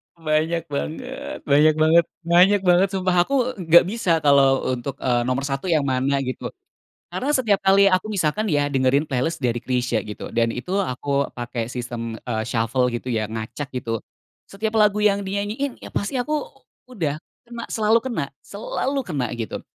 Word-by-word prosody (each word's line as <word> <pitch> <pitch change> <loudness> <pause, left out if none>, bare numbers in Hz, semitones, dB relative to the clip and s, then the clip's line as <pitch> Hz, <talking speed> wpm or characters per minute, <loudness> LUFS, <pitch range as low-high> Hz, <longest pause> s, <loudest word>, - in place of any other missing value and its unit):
Banyak 160 +1 0
banget, 70 +2 -5
banyak 150 +2 +4
banget, 160 +2 +5 0.2
banyak 180 +4 +5
banget, 180 +2 +5
sumpah 185 -1 +1
aku 275 - 0 0.2
nggak 170 0 +6
bisa 185 -5 +1
kalau, 140 -2 +4
eee, - - +1
untuk, 135 +2 -5
eee, 120 -3 +1
nomor 130 +2 0
1 135 +5 -3
yang 155 -4 +3
mana, 135 +1 +1
gitu. 130 - -4 0.6
Karena 275 - -3
setiap 230 -8 +3
kali 195 +1 +6
aku 185 +3 0
misalkan 195 +1 0
ya, 145 -1 +2
dengerin 135 +2 +2
playlist 145 +5 -1
dari 120 -1 -1
Chrisye, 125 -3 0
gitu, 105 -1 -7
dan 115 0 +2
itu 180 +12 -4
aku 140 -5 0
pakai 120 -1 -4
sistem, 115 -2 -5
eee, 110 -3 -3
shuffle, 120 +2 0
gitu 120 +2 -4
ya, 110 -3 0
ngacak, 115 +6 -5
gitu. 115 -3 -3 0.5
Setiap 215 +2 -3
lagu 210 -1 +4
yang 200 -1 +3
dinyanyiin, 205 +7 -3
ya - - -9
pasti 250 +6 -1
aku 300 +3 -1 0.5
udah, 160 - -2 0.3
kena, 235 -1 -6
selalu 220 +1 +3
kena. 220 - -2 0.2
Selalu 265 +6 -3
kena, 135 -8 -2
gitu. 115 -2 -5
150 Hz, 165 wpm, -22 LUFS, 125-195 Hz, 0.6 s, nggak